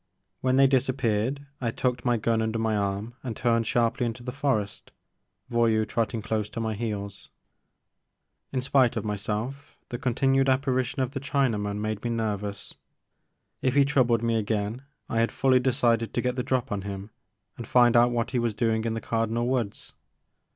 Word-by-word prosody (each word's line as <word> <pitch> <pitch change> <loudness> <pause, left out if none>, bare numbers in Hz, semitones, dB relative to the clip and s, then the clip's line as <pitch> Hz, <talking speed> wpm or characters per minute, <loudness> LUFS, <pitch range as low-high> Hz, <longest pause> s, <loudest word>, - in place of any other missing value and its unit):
When 130 0 +1
they 135 0 +6
disap 130 0 +1
peared 120 +5 0 0.2
I 120 - 0
tucked 125 +1 -1
my 120 -2 +3
gun 115 +1 +1
under 110 0 -1
my 110 -1 0
arm 100 +3 -2
and 120 -5 -5
turned 115 -2 +1
sharply 120 0 +1
into 120 +1 -6
the 125 - -4
forest, 130 -7 -2 0.6
Voyou 115 -2 +2
trotting 115 -1 -1
close 105 -1 -1
to - - -6
my 110 -1 -1
heels. 100 -2 -5 1.2
In 130 - -1
spite 130 -2 +3
of 110 - -3
myself 110 +7 -4
the 120 - -4
continued 135 +2 +2
apparition 130 0 +1
of 125 - -3
the 135 - -4
Chinaman 115 -8 0
made 110 0 -3
me 120 - -1
nervous. 105 -3 -3 0.9
If 130 0 +1
he 140 -1 +6
troubled 125 -5 +2
me 115 -1 +2
again 105 +2 -1 0.3
I 115 - -1
had 115 - +2
fully 130 -1 +3
decided 120 -3 +1
to 120 - +1
get 125 0 -1
the 130 - -1
drop 130 -1 -1
on 100 -1 -1
him 100 +1 -6 0.4
and - - -8
find 120 -1 +5
out 120 +1 +6
what 120 0 -1
he 125 - +1
was 115 -3 -1
doing 110 0 +1
in 115 -1 -1
the 115 - -3
Cardinal 115 +1 -1
Woods. 120 -5 -2
115 Hz, 180 wpm, -27 LUFS, 110-130 Hz, 1.2 s, they